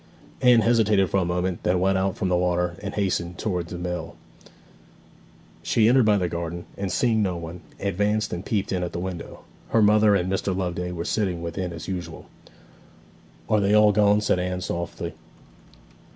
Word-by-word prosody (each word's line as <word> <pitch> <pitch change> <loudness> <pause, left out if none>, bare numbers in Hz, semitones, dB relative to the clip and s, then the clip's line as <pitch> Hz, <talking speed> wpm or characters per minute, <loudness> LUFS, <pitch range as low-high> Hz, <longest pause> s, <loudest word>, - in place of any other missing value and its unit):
Anne 125 -2 +6
hesitated 105 -4 +3
for - - +2
a 95 - +1
moment, 90 0 -2
then 90 0 +1
went 95 +1 +2
out 95 0 0
from 95 - -1
the 90 - +2
water, 90 -1 0
and 100 -1 -5
hastened 90 -3 -1
towards 90 -5 -3
the 90 - -5
mill. 90 0 -5 1.5
She 110 -1 +2
entered 125 -1 +4
by 105 -1 +4
the 90 -2 0
garden, 85 0 -5
and, 100 -2 -3
seeing 115 0 +2
no 95 -4 0
one, 85 +1 -8 0.2
advanced 105 +2 0
and 90 +1 -4
peeped 100 -3 -2
in 90 -2 -1
at 90 - -4
the - - -3
window. 90 -1 -6 0.3
Her 115 - +3
mother 105 0 +5
and 90 -2 0
Mr. 95 0 -1
Loveday 90 -1 -2
were 85 -1 -4
sitting 95 -6 -1
within 85 +2 -4
as 80 -2 -8
usual. 90 -3 -6 1.2
'Are 110 - +3
they 100 +1 +3
all 105 0 +6
gone?' 105 0 +3
said 95 - +1
Anne 90 0 -2
softly. 85 -2 -4
95 Hz, 180 wpm, -24 LUFS, 90-105 Hz, 1.5 s, Anne